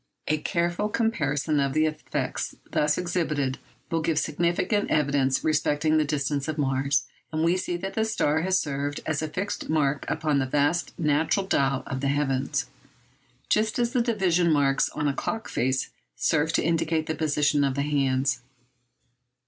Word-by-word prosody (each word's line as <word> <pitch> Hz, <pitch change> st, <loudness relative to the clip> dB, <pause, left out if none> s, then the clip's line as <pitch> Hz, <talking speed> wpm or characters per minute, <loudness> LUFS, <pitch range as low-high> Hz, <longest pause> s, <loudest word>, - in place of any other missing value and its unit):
A 155 Hz, 0 st, +1 dB
careful 175 Hz, +5 st, 0 dB
comparison 155 Hz, -10 st, 0 dB
of 140 Hz, -1 st, +1 dB
the 155 Hz, 0 st, +3 dB
effects 155 Hz, -1 st, -3 dB, 0.2 s
thus 150 Hz, 0 st, +2 dB
exhibited 155 Hz, -7 st, -1 dB, 0.3 s
will 165 Hz, -1 st, +1 dB
give 160 Hz, -1 st, 0 dB
significant 170 Hz, +7 st, 0 dB
evidence 140 Hz, -3 st, +2 dB
respecting 155 Hz, 0 st, +2 dB
the -, -, +3 dB
distance 140 Hz, -1 st, -1 dB
of 155 Hz, 0 st, -3 dB
Mars. 135 Hz, 0 st, +1 dB, 0.3 s
And 155 Hz, 0 st, -1 dB
we 170 Hz, +2 st, +3 dB
see 180 Hz, -1 st, -2 dB
that 195 Hz, +2 st, -5 dB
the 220 Hz, -, +1 dB
star 160 Hz, -8 st, +1 dB
has 185 Hz, +2 st, +2 dB
served 145 Hz, 0 st, -3 dB
as 155 Hz, -2 st, -1 dB
a 155 Hz, -, -1 dB
fixed 185 Hz, +6 st, -4 dB
mark 145 Hz, -3 st, +1 dB
upon 150 Hz, -3 st, 0 dB
the 135 Hz, -, 0 dB
vast 145 Hz, +5 st, 0 dB
natural 160 Hz, +4 st, +1 dB
dial 135 Hz, -7 st, +1 dB
of 130 Hz, -, -4 dB
the 140 Hz, -, 0 dB
heavens, 135 Hz, -1 st, 0 dB, 0.8 s
just 215 Hz, 0 st, +1 dB
as 240 Hz, -1 st, 0 dB
the 250 Hz, -, +3 dB
division 185 Hz, -7 st, +2 dB
marks 140 Hz, -2 st, +3 dB
on 150 Hz, 0 st, -2 dB
a 140 Hz, -, +1 dB
clock 225 Hz, +10 st, -3 dB
face 130 Hz, +1 st, -1 dB, 0.2 s
serve 160 Hz, 0 st, +1 dB
to -, -, +2 dB
indicate 165 Hz, -1 st, +1 dB
the 160 Hz, -, -2 dB
position 150 Hz, -2 st, +1 dB
of 135 Hz, -2 st, 0 dB
the 140 Hz, -, 0 dB
hands. 135 Hz, -3 st, +1 dB
150 Hz, 165 wpm, -26 LUFS, 140-170 Hz, 0.8 s, the